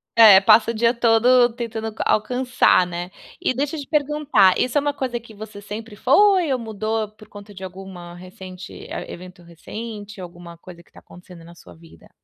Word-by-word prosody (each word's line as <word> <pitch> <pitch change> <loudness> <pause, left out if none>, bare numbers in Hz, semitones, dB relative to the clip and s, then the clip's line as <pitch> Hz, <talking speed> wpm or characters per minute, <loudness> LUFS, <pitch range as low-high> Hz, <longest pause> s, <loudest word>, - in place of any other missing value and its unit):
É, 210 -4 +8
passa 220 +2 +5
o - - -7
dia 230 +2 +2
todo 240 +1 +3
tentando 225 -2 -5
a - - 0
alcançar, 250 -3 +2
né. 175 0 -6 0.3
E - - -1
deixa 285 +4 -3
eu - - -5
te 280 - -8
perguntar, 295 - +2
isso 255 +3 0
é - - +3
uma 290 0 -1
coisa 255 -3 -4
que 230 -1 -16
você 210 -1 -10
sempre 210 +1 -8
foi 355 - +3
ou 255 - 0
mudou 220 -1 -3
por 215 0 -18
conta 205 0 -13
de 190 - -11
alguma 185 -2 -10
recente 185 0 -11 0.2
eh, - - -7
evento 180 0 -12
recente, 210 +4 -9
alguma 175 -1 -11
coisa 170 0 -14
que - - -29
está - - -17
acontecendo 175 -1 -15
na 170 0 -15
sua 90 - -16
vida? 80 0 -19
215 Hz, 195 wpm, -21 LUFS, 185-240 Hz, 0.3 s, É